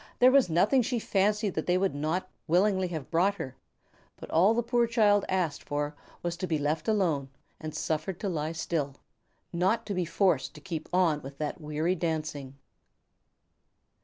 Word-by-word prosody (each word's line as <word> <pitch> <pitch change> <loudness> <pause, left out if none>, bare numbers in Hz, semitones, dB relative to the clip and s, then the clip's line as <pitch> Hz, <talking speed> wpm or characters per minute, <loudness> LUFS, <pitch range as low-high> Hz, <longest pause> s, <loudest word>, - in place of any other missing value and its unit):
There 255 +1 +6
was 270 -7 +5
nothing 200 +11 +4
she 245 +1 -1
fancied 210 -1 +1
that 160 - -3
they 180 0 +3
would 195 +1 +1
not 155 +6 -1 0.2
willingly 190 +2 +3
have 160 -6 -6
brought 185 +4 +3
her; 130 -8 -6 0.6
but - - -10
all 190 +7 +4
the 240 - +1
poor 235 0 +2
child 210 -3 +3
asked 180 -5 0
for 145 0 -3 0.3
was 175 0 -2
to 185 - -3
be 160 - +1
left 150 +5 -1
alone 170 -11 +1 0.3
and 155 -1 -6
suffered 160 +3 -2
to 205 - -1
lie 160 -3 -2
still, 155 -4 -2 0.6
not 190 +7 +1
to 205 - -3
be 180 -2 0
forced 170 -3 +1
to - - -10
keep 165 -5 -6
on 175 -5 +2
with 135 +1 -10
that 150 +3 -4
weary 155 +3 0
dancing! 155 -5 -3
175 Hz, 175 wpm, -29 LUFS, 155-200 Hz, 0.6 s, There